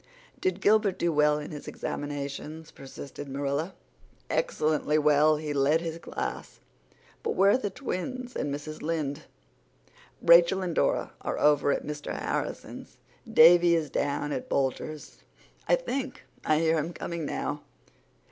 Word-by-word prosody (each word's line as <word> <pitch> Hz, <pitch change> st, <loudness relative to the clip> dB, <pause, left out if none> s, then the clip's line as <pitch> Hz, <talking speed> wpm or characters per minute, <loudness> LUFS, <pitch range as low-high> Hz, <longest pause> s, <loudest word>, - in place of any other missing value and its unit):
"Did 185 Hz, +1 st, -1 dB
Gilbert 210 Hz, -2 st, +3 dB
do 170 Hz, -, +1 dB
well 150 Hz, 0 st, +4 dB
in 150 Hz, -, -6 dB
his 150 Hz, -2 st, -8 dB
examinations?" 145 Hz, +2 st, -5 dB
persisted 140 Hz, +1 st, -9 dB
Marilla. 140 Hz, +6 st, -2 dB, 0.6 s
"Excellently 155 Hz, -, +1 dB
well. 150 Hz, 0 st, +4 dB
He 150 Hz, -1 st, -4 dB
led 145 Hz, +3 st, +3 dB
his 165 Hz, -1 st, -5 dB
class. -, -, -5 dB, 0.6 s
But 460 Hz, -, -2 dB
where 195 Hz, +1 st, +5 dB
are -, -, +4 dB
the 205 Hz, -, -2 dB
twins 250 Hz, +3 st, -5 dB
and 145 Hz, -, -2 dB
Mrs. 150 Hz, +2 st, -6 dB
Lynde?" 155 Hz, -2 st, -3 dB, 0.9 s
"Rachel 170 Hz, +3 st, +6 dB
and 175 Hz, -2 st, -2 dB
Dora -, -, +1 dB
are -, -, -3 dB
over 145 Hz, -1 st, +3 dB
at -, -, -1 dB
Mr. 150 Hz, 0 st, -5 dB
Harrison's. -, -, -4 dB, 0.3 s
Davy 170 Hz, +1 st, +7 dB
is 155 Hz, -4 st, -1 dB
down 145 Hz, +1 st, -1 dB
at 130 Hz, -, -4 dB
Boulters'. 140 Hz, +3 st, -2 dB, 0.5 s
I -, -, +5 dB
think 275 Hz, -, -4 dB, 0.2 s
I 155 Hz, -, +3 dB
hear 160 Hz, 0 st, +2 dB
him 160 Hz, +4 st, -3 dB
coming 170 Hz, -1 st, -5 dB
now." 145 Hz, 0 st, -3 dB
155 Hz, 140 wpm, -28 LUFS, 145-175 Hz, 0.9 s, Davy